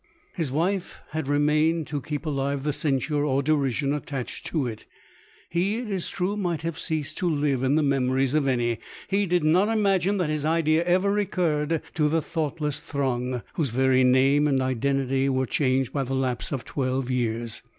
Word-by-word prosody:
His 160 -7 -2
wife 180 +6 -1
had 155 -2 -3
remained 150 +3 +2
to 145 -1 -4
keep 150 +3 -5
alive 140 -2 -1
the 150 0 0
censure 145 0 0
or 140 -1 +1
derision 140 -1 +1
attached 140 -3 -5
to 155 -5 -1
it. 115 -3 -6 0.6
He, 190 +6 0
it 235 -3 -5
is 190 -3 -2
true, 190 +3 -1
might 175 -6 -2
have 165 -1 -3
ceased 155 -4 -3
to 180 - +1
live 145 -4 +1
in 135 +2 +2
the 155 - +3
memories 135 -1 +1
of 150 -2 +2
any. 120 -3 +1 0.3
He 200 +1 +1
did 175 -1 +1
not 180 +7 +4
imagine 200 -3 +2
that 175 -5 0
his 155 -1 -2
idea 160 +1 +2
ever 185 +3 +3
recurred 165 -6 0
to 150 -2 +2
the 165 +2 +2
thoughtless 150 -2 -2
throng, 130 -5 -2
whose 150 -5 -1
very 130 +2 +3
name 135 +3 +4
and 135 -2 +2
identity 135 +1 0
were 130 0 +1
changed 130 -1 0
by 140 - 0
the 135 +1 -3
lapse 130 -2 -2
of 130 -5 -3
twelve 130 -1 -2
years. 120 -2 -2
145 Hz, 180 wpm, -25 LUFS, 130-165 Hz, 0.6 s, not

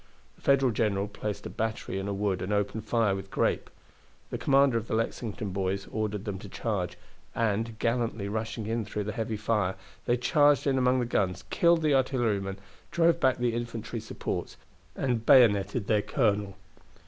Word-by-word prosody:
The - - -24
Federal 135 -2 +3
general 105 -2 0
placed 105 0 -5
a - - -4
battery 110 -3 -3
in 95 - -4
a 100 - -1
wood 100 -2 -1
and 95 - -3
opened 105 +1 -1
fire 110 -3 +2
with 95 0 -7
grape. - - 0 0.6
The - - -3
commander 135 -3 +4
of 115 - -9
the - - -1
Lexington 110 -2 -3
boys 95 +1 -2
ordered 105 -2 -2
them 100 -3 -4
to 100 - -10
charge, 95 -5 -3 0.4
and, 115 0 0
gallantly 115 -3 -1
rushing 110 +1 -3
in 115 +1 -1
through 105 0 -4
the 105 - -3
heavy 110 0 -3
fire, 105 -3 0 0.3
they 120 - +3
charged 145 +1 +3
in 135 -2 +2
among 125 0 +3
the - - 0
guns, 95 -6 0
killed 170 -1 +4
the 150 -2 +3
artillerymen, 115 -8 +1 0.3
drove 170 0 +3
back 130 -1 +3
the 120 -2 0
infantry 115 -1 -4
supports, 110 - -5 0.4
and 120 -4 -1
bayoneted 105 -3 +5
their 105 -1 +2
colonel. 105 -5 0
110 Hz, 175 wpm, -28 LUFS, 100-120 Hz, 0.6 s, bayoneted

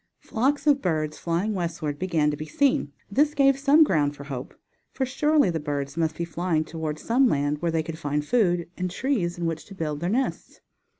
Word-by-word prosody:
Flocks 275 +5 -1
of 285 -2 +4
birds 155 -3 -1
flying 175 +6 -1
westward 165 -5 -3
began 165 -5 +1
to - - -3
be 155 +1 -7
seen. 275 - +1 0.2
This 295 +6 +2
gave 275 -1 +4
some 290 +3 +6
ground 145 - +1
for 140 - -9
hope. 135 -3 -7 0.4
For 265 - -1
surely 295 - +2
the 165 - -2
birds 145 -2 -3
must 160 -1 0
be 170 - -2
flying 170 -1 -1
toward 160 -2 -4
some 250 +9 +2
land 145 -5 0
where 170 - +1
they 160 -1 0
could 160 0 -7
find 145 -1 -1
food, 175 -6 +2
and 185 0 -2
trees 180 -5 -1
in 175 - -3
which 165 -1 -2
to 195 - -12
build 150 -4 -3
their 175 +3 -1
nests. 255 +6 -2
170 Hz, 205 wpm, -25 LUFS, 155-245 Hz, 0.4 s, some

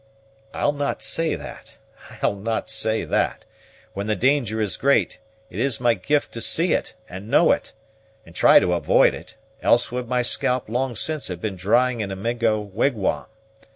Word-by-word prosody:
"I'll - - 0
not 145 -1 -3
say 165 -1 -1
that, - - -11 0.5
I'll - - +2
not 110 +3 -3
say 110 0 0
that. - - -1 0.5
When 100 +1 -4
the 110 - +1
danger 130 -4 +1
is 105 -3 -1
great, 140 +1 +1 0.3
it 95 - -6
is 130 -2 0
my 120 -1 +3
gift 145 +5 -1
to 115 - -7
see 165 +7 +2
it, - - -2
and 95 +3 -9
know - - +5
it, - - -2 0.5
and 85 - -15
to - - -8
try - - +7
to 90 - 0
avoid 85 - +3
it; 90 +6 -11 0.3
else 120 0 +2
would 125 -1 -4
my 125 0 0
scalp 125 +1 +1
long 125 +2 -2
since 155 +6 -3
have 90 -2 -6
been 100 0 -4
drying 120 +7 +1
in 100 - -3
a 95 - -4
Mingo 115 +1 0
wigwam. 105 +1 -1
115 Hz, 185 wpm, -22 LUFS, 100-130 Hz, 0.5 s, try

